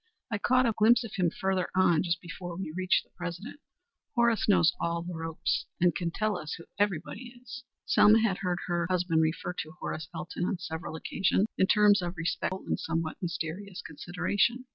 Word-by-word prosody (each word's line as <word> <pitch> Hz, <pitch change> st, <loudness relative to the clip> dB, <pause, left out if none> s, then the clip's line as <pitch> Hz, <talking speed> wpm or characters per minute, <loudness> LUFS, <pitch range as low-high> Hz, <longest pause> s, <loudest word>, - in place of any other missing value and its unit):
I 205 Hz, -, -1 dB
caught 255 Hz, +4 st, +3 dB
a 230 Hz, -, +3 dB
glimpse 235 Hz, +3 st, +5 dB
of 230 Hz, -, -8 dB
him 180 Hz, -2 st, +2 dB
further 190 Hz, +1 st, -1 dB
on 180 Hz, -4 st, +4 dB
just 175 Hz, -1 st, -1 dB
before 175 Hz, 0 st, -7 dB
we 185 Hz, -5 st, -4 dB
reached 185 Hz, 0 st, +2 dB
the -, -, -33 dB
President. 180 Hz, -, -7 dB, 0.6 s
Horace 235 Hz, -3 st, +3 dB
knows 180 Hz, -5 st, +5 dB
all 170 Hz, 0 st, -1 dB
the 175 Hz, +1 st, -6 dB
ropes 165 Hz, -1 st, -2 dB
and 175 Hz, 0 st, +4 dB
can 175 Hz, -3 st, -2 dB
tell 210 Hz, +2 st, -1 dB
us 155 Hz, -, -5 dB
who 165 Hz, -, -11 dB, 0.2 s
everybody 205 Hz, +4 st, -1 dB
is." 250 Hz, +1 st, -9 dB, 0.2 s
Selma 215 Hz, +2 st, +6 dB
had 205 Hz, -4 st, +1 dB
heard 180 Hz, -2 st, -1 dB
her 175 Hz, -1 st, 0 dB
husband 175 Hz, -3 st, +2 dB
refer 160 Hz, +2 st, -1 dB
to 155 Hz, -2 st, -6 dB
Horace 160 Hz, +1 st, -5 dB
Elton 175 Hz, +1 st, -3 dB
on 185 Hz, -, -1 dB
several 165 Hz, -2 st, -5 dB
occasions 190 Hz, +4 st, +1 dB
in 190 Hz, -, +3 dB
terms 210 Hz, -2 st, +5 dB
of 175 Hz, 0 st, -4 dB
respectful 180 Hz, +3 st, -2 dB
and -, -, -1 dB
somewhat 165 Hz, -1 st, -3 dB
mysterious 180 Hz, +3 st, -4 dB
consideration. 185 Hz, -, -1 dB
180 Hz, 185 wpm, -29 LUFS, 170-205 Hz, 0.6 s, Selma